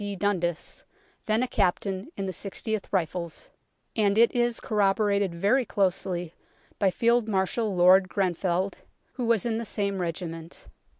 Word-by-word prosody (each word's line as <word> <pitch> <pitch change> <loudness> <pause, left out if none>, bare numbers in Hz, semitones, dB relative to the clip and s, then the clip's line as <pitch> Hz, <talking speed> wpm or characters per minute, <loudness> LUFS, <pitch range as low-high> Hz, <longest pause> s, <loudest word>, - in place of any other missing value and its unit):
D. 205 -1 -4
Dundas, 180 -4 -2 0.4
then 220 +3 +2
a - - -1
captain 195 - -1
in 195 - -2
the 190 - -2
6oth 205 +3 -3
Rifles, 170 -2 -3 0.5
and 205 -2 +2
it 235 +1 +5
is 240 -1 +1
corroborated 200 -3 +1
very 205 +10 +2
closely 180 -5 -1 0.5
by 195 - +4
Field 235 +3 +2
Marshal 200 +1 0
Lord 185 +1 +6
Grenfell, 185 0 0 0.4
who 245 -3 -3
was 230 -2 +2
in 225 -1 0
the - - -3
same 200 -3 -2
regiment. 165 -1 -5
195 Hz, 140 wpm, -27 LUFS, 180-220 Hz, 0.5 s, Lord